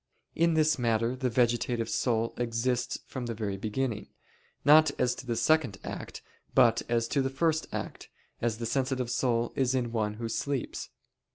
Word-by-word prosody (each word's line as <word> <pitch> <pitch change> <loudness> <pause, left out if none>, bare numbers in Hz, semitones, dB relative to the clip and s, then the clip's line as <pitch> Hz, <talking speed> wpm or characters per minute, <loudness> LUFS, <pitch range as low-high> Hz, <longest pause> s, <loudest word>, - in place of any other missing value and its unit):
In 170 0 +3
this 155 -2 +3
matter, 115 +1 +1
the 130 0 -1
vegetative 120 -1 +1
soul 115 -1 0
exists 120 +1 -1
from 125 -3 -5
the 115 - -3
very 105 -3 -3
beginning, 110 +2 -2 0.6
not 155 +1 +7
as 125 - +2
to 130 - -10
the 120 - 0
second 150 -8 +2
act, - - -7 0.3
but 115 -1 +5
as 115 -1 +1
to 140 - +1
the 135 - 0
first 160 +3 0
act, - - -6 0.3
as 115 -2 0
the 115 - -4
sensitive 130 0 -1
soul 120 -2 0
is 130 -1 +1
in 120 -2 -1
one 105 -2 -1
who 115 +1 -4
sleeps. 135 +3 -3
120 Hz, 170 wpm, -29 LUFS, 115-135 Hz, 0.6 s, not